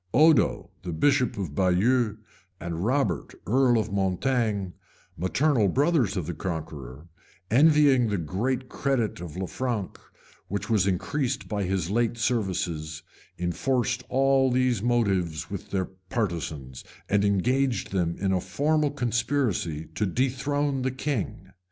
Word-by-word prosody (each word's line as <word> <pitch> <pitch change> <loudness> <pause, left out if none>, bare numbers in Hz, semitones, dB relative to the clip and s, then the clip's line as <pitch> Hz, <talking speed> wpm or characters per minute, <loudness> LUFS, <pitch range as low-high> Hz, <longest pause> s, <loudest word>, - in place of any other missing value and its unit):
Odo, 155 -4 +4 0.3
bishop 135 - +2
of 90 -8 -4
Baieux, 105 - +2 0.4
and 85 0 -4
Robert, 110 - 0
earl 125 +1 +3
of 110 - -1
Mortaigne, 100 +1 0 0.4
maternal 115 - +2
brothers 135 - +2
of 90 - -2
the 85 - -4
Conqueror, 75 -4 -6 0.4
envying 140 -2 +5
the 105 -2 0
great 120 - -2
credit 125 -9 -1
of 85 -1 -7
Lanfranc, 105 +2 -3 0.5
which 100 +3 -3
was 100 -4 +3
increased 120 +8 -1
by 100 -2 -2
his 95 -1 -1
late 120 +1 +1
services 90 -10 -1 0.3
enforced 125 +8 0
all 135 0 +3
these 125 -4 +1
motives 95 -10 0
with 100 - -6
their 95 -2 0
partisans, 85 - -4 0.2
and 100 0 +2
engaged 120 +4 +1
them 85 -3 0
in 95 -1 0
a 95 -1 +1
formal 150 - +1
conspiracy 120 - -1
to 105 - 0
dethrone 135 +5 0
the 130 - 0
king. 130 -7 -3
110 Hz, 125 wpm, -26 LUFS, 90-130 Hz, 0.5 s, envying